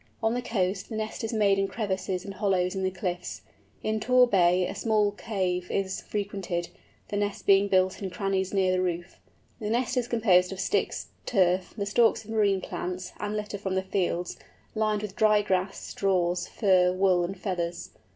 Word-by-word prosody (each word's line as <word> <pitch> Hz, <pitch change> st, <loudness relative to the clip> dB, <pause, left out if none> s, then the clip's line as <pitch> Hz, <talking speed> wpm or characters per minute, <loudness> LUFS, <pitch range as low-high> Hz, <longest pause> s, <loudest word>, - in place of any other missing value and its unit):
On 220 Hz, +1 st, +2 dB
the 245 Hz, -, -1 dB
coast 195 Hz, -4 st, -1 dB
the 225 Hz, -, -5 dB
nest 220 Hz, +1 st, -4 dB
is 225 Hz, -, -2 dB
made 205 Hz, -3 st, +3 dB
in 195 Hz, -, +1 dB
crevices 190 Hz, -4 st, -3 dB
and 200 Hz, -, -6 dB
hollows 185 Hz, -2 st, +1 dB
in 190 Hz, -, -3 dB
the 190 Hz, -, +1 dB
cliffs; 180 Hz, -1 st, -4 dB, 0.4 s
in 220 Hz, 0 st, 0 dB
Tor 250 Hz, +3 st, +5 dB
Bay 180 Hz, -5 st, +3 dB
a -, -, -4 dB
small 210 Hz, -1 st, +2 dB
cave 185 Hz, -4 st, -2 dB
is 195 Hz, -1 st, -1 dB
frequented, 195 Hz, -4 st, -3 dB, 0.4 s
the 205 Hz, -, -2 dB
nests 205 Hz, 0 st, -2 dB
being 195 Hz, 0 st, +5 dB
built 185 Hz, 0 st, +2 dB
in 195 Hz, -, -3 dB
crannies 190 Hz, 0 st, -1 dB
near 190 Hz, -2 st, +2 dB
the 185 Hz, 0 st, +1 dB
roof. 175 Hz, 0 st, -3 dB, 0.4 s
The 210 Hz, -2 st, -3 dB
nest 245 Hz, +2 st, 0 dB
is 245 Hz, -1 st, +1 dB
composed 195 Hz, -7 st, +3 dB
of 190 Hz, -, -6 dB
sticks, -, -, -1 dB, 0.2 s
turf, 185 Hz, -4 st, +2 dB
the 200 Hz, -, -1 dB
stalks 225 Hz, +2 st, +3 dB
of 220 Hz, -, -9 dB
marine 200 Hz, -3 st, +2 dB
plants, 180 Hz, +1 st, -5 dB
and 210 Hz, +1 st, -2 dB
litter 210 Hz, -1 st, -4 dB
from 190 Hz, -1 st, -2 dB
the 190 Hz, -, 0 dB
fields, 180 Hz, -2 st, -1 dB, 0.4 s
lined 215 Hz, -1 st, 0 dB
with 205 Hz, -2 st, -6 dB
dry 215 Hz, -1 st, +4 dB
grass, 190 Hz, 0 st, 0 dB
straws, 180 Hz, -2 st, 0 dB
fur, 185 Hz, -3 st, +3 dB
wool, 185 Hz, -1 st, +3 dB
and 190 Hz, +3 st, -4 dB
feathers. 175 Hz, -3 st, -3 dB
195 Hz, 190 wpm, -27 LUFS, 185-210 Hz, 0.4 s, Tor